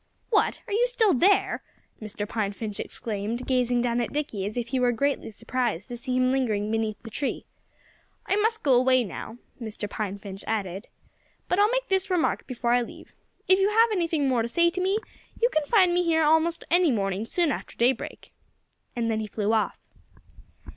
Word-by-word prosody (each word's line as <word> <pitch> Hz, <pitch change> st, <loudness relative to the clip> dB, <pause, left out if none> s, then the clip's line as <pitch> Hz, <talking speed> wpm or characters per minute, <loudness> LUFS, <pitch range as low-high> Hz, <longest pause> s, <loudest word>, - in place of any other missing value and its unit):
"What! 420 Hz, -, +2 dB
Are -, -, -5 dB
you 475 Hz, +4 st, +3 dB
still 460 Hz, -5 st, +3 dB
there?" 385 Hz, +9 st, +3 dB, 0.4 s
Mr. 210 Hz, -1 st, -5 dB
Pine 210 Hz, -3 st, -2 dB
Finch 210 Hz, -1 st, -6 dB
exclaimed, 225 Hz, +3 st, -4 dB
gazing 245 Hz, -2 st, +1 dB
down 240 Hz, 0 st, +1 dB
at 235 Hz, -, -3 dB
Dickie 255 Hz, -10 st, -2 dB
as 215 Hz, -, -6 dB
if 235 Hz, -1 st, -2 dB
he 265 Hz, -, 0 dB
were 250 Hz, -1 st, +3 dB
greatly 280 Hz, +3 st, -1 dB
surprised 230 Hz, -3 st, -3 dB
to 245 Hz, -, -5 dB
see 250 Hz, +1 st, -2 dB
him 255 Hz, 0 st, +3 dB
lingering 215 Hz, -6 st, 0 dB
beneath 220 Hz, -1 st, -1 dB
the 225 Hz, -, -9 dB
tree. 280 Hz, -, -3 dB, 0.8 s
"I -, -, +1 dB
must 445 Hz, +1 st, +1 dB
go 275 Hz, -, +4 dB
away 255 Hz, 0 st, +4 dB
now," 220 Hz, +2 st, -7 dB, 0.2 s
Mr. 220 Hz, -2 st, -5 dB
Pine 205 Hz, -1 st, -4 dB
Finch 195 Hz, -1 st, -8 dB
added. 195 Hz, -2 st, -3 dB, 0.6 s
"But 360 Hz, -, +1 dB
I'll 415 Hz, +1 st, +5 dB
make -, -, -1 dB
this 385 Hz, 0 st, 0 dB
remark 360 Hz, -3 st, 0 dB
before 240 Hz, -2 st, -1 dB
I 245 Hz, 0 st, +4 dB
leave: 235 Hz, -, -9 dB, 0.3 s
If 375 Hz, +1 st, +5 dB
you 390 Hz, +1 st, +3 dB
have 450 Hz, +2 st, +4 dB
anything 330 Hz, -7 st, +1 dB
more 250 Hz, -3 st, +2 dB
to 225 Hz, -, -1 dB
say 340 Hz, +8 st, +3 dB
to 365 Hz, +1 st, -3 dB
me, 385 Hz, +3 st, +2 dB, 0.4 s
you 475 Hz, +1 st, +3 dB
can 310 Hz, -1 st, +1 dB
find 370 Hz, -4 st, +4 dB
me 355 Hz, 0 st, +2 dB
here 325 Hz, -2 st, +2 dB
almost 320 Hz, +2 st, +2 dB
any 350 Hz, -1 st, +4 dB
morning 195 Hz, -4 st, 0 dB
soon 330 Hz, +6 st, 0 dB
after -, -, -5 dB
daybreak." 240 Hz, +1 st, -1 dB, 0.6 s
And 235 Hz, -1 st, -1 dB
then 220 Hz, -1 st, 0 dB
he 215 Hz, -, -3 dB
flew 210 Hz, +1 st, -1 dB
off. 220 Hz, -, +1 dB
250 Hz, 195 wpm, -26 LUFS, 220-345 Hz, 0.8 s, I'll